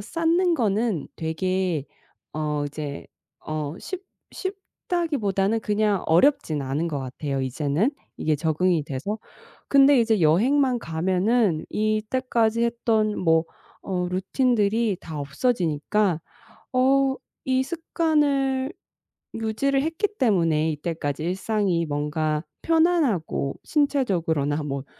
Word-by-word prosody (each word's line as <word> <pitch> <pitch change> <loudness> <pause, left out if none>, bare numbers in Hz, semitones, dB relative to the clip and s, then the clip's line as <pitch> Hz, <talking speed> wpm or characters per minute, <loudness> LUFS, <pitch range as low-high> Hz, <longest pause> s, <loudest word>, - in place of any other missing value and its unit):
쌓는 330 - +1
거는 215 - 0
되게 175 -1 -1 0.5
어 150 -1 -1
이제 145 -1 -6 0.4
어 155 -1 -3
쉽 375 0 -6 0.3
쉽다기보다는 290 - -2
그냥 210 -2 +1
어렵지는 165 - +3
않은 145 +6 -1
것 150 -3 -2
같아요 135 +1 -4
이제는 145 - 0 0.3
이게 155 -1 0
적응이 160 +2 +1
돼서. 150 +11 -4 0.5
근데 275 -1 +6
이제 225 -4 +2
여행만 245 - +3
가면은 185 +2 +1
이때까지 225 +2 0
했던 225 -2 +1
뭐 165 -2 +3 0.4
어 180 -2 -1
루틴들이 210 +2 +1
다 155 -3 -6
없어지니까 170 - 0 0.5
어 265 +1 +3 0.3
이 260 0 +3
습관을 285 -3 0 0.6
유지를 225 +5 0
했기 325 +7 0
때문에 165 -8 +2
이때까지 155 -1 -3
일상이 190 -1 0
뭔가 150 +1 -1 0.2
편안하고 320 - +1
신체적으로나 170 - +1
뭐 140 -2 -4
200 Hz, 240 characters per minute, -24 LUFS, 155-255 Hz, 0.6 s, 근데